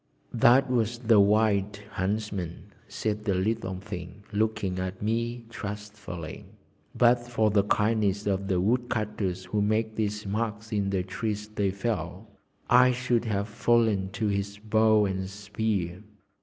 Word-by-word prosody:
"That 125 +4 +5
was 120 -2 0
the 115 -3 +4
Wild 100 -1 +3
Huntsman," 95 -3 -3
said 105 -1 -3
the 100 -3 +1
little 95 0 -1
thing, 95 0 -8
looking 105 -3 0
at 95 0 -4
me 115 +2 -2
trustfully. 105 -6 -7 0.5
"But 120 0 +5
for 110 -3 +2
the 100 -1 +3
kindness 105 -1 +1
of 100 -1 0
the 95 -3 +1
woodcutters 105 -4 -1
who 105 +3 -1
make 110 +1 +1
these 105 -1 -1
marks 105 +1 -3
in 100 -2 0
the 95 -2 0
trees 105 +2 -4
they 105 -2 0
fell, 100 -1 -3 0.4
I 125 +1 +6
should 125 -1 0
have 100 -2 -1
fallen 110 -3 +2
to 110 +2 -2
his 100 0 -2
bow 110 0 +3
and 95 -1 -2
spear. 100 -3 -2
105 Hz, 140 wpm, -27 LUFS, 100-110 Hz, 0.5 s, I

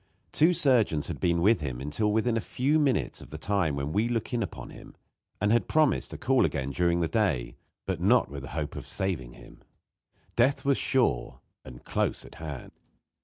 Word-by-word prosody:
Two 160 +4 +4
surgeons 120 - +2
had - - -5
been 85 -1 +1
with 105 -3 +4
him 65 -4 -4
until 75 +11 -1
within 110 +2 +1
a - - +1
few 140 +9 +1
minutes 135 -7 0
of - - -12
the 80 - -7
time 90 -4 0
when 70 +2 -3
we 110 +3 +2
look 115 0 -2
in 120 - 0
upon 100 - -6
him, - - -13 0.4
and 105 +1 +1
had 120 0 +2
promised 155 -3 +2
to - - -7
call 130 +1 +2
again 70 0 -1
during 85 +3 +1
the 85 - +1
day, 85 - 0 0.3
but - - -3
not - - +4
with 70 0 -7
the 65 - -8
hope 75 -2 -3
of - - -7
saving 80 -11 -3
him. - - -15 0.8
Death 130 +5 +2
was 140 -1 +3
sure, 115 - 0 0.2
and 60 -2 -12
close - - -1
at - - -13
hand. 75 -5 -7
95 Hz, 200 wpm, -28 LUFS, 75-120 Hz, 0.8 s, Two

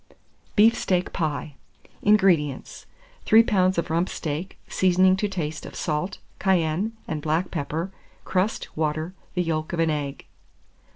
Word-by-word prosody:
BEEF 225 +2 +6
STEAK 180 -1 0
PIE. 155 -2 -2 0.5
604. - - +1
INGREDIENTS. 175 -10 +2 0.4
3 225 +1 +7
lbs. 185 -4 +2
of 170 - -1
rump 170 +3 +1
steak, 160 +5 -4
seasoning 185 0 +4
to 205 +2 0
taste 160 -5 -4
of - - -9
salt, 165 +5 -2 0.2
cayenne, 185 +2 +1
and 155 -2 -3
black 160 +4 0
pepper, 160 +6 -3 0.3
crust, 190 +4 -1
water, 155 +2 -1 0.2
the 180 - +2
yolk 155 -1 -2
of 170 - -2
an 165 -1 +3
egg. 145 -2 -4
170 Hz, 140 wpm, -25 LUFS, 155-190 Hz, 0.5 s, 3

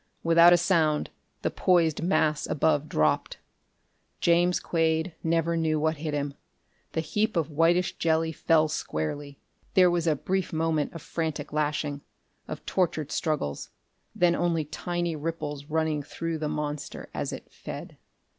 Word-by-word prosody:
Without 170 +1 +7
a 175 - +7
sound, 160 -4 +2 0.3
the - - 0
poised 165 -4 +2
mass 155 -4 +1
above 150 0 +1
dropped. 75 0 +1 0.8
James 175 +1 +3
Quade 160 0 0
never 165 0 +1
knew 160 -2 +1
what 160 +1 +1
hit 155 +1 -3
him. 145 -1 -2 0.6
The 160 - 0
heap 210 +7 -1
of 160 -1 0
whitish 170 +4 +2
jelly 160 0 +2
fell 160 0 +3
squarely. 140 - -4 0.4
There 180 -2 +6
was 170 -1 0
a 155 - +3
brief 190 +5 -2
moment 160 -2 0
of 165 -3 -8
frantic 160 -3 -3
lashing, 150 -1 -1 0.5
of - - -7
tortured 160 -5 0
struggles 150 - -2 0.5
then 175 -1 +4
only 170 -3 0
tiny 175 +2 -3
ripples 150 -2 -4
running 155 -1 0
through 165 +2 -4
the 150 -1 -2
monster 150 -1 -4
as - - -3
it - - -9
fed. - - -8
160 Hz, 145 wpm, -27 LUFS, 150-170 Hz, 0.8 s, Without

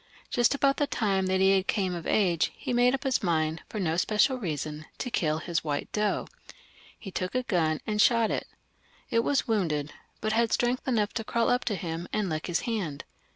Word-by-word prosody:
Just 240 +3 +3
about 275 0 +2
the 290 - +1
time 195 -7 0
that 190 0 +1
he 190 0 +5
came 190 -1 -1
of 170 -2 -5
age, 175 -6 +2
he - - -4
made 245 +2 +4
up 270 - -7
his 265 -3 +1
mind, 160 -4 0
for 215 - -4
no 165 -3 0
special 235 +8 +2
reason, 155 - -4
to 250 - -4
kiU 155 -6 +1
his 170 0 -2
white 145 -2 -3
doe. 210 0 0 0.7
He 195 - -9
took 185 +3 -3
a 255 - +1
gun 160 -8 0
and 210 -1 +1
shot 230 -2 +4
at - - 0
it. - - -18 0.6
It 230 - +3
was 280 +2 +1
wounded, 160 -10 0 0.3
but 215 0 -1
had 230 0 +2
strength 245 +2 0
enough 220 -5 +1
to 225 - -2
crawl 230 +1 +1
up 245 - +1
to 215 - 0
him 170 -1 -4
and 210 -3 0
lick 155 -1 -3
his 175 -1 0
hand. 195 - -3
200 Hz, 210 wpm, -28 LUFS, 165-235 Hz, 0.7 s, he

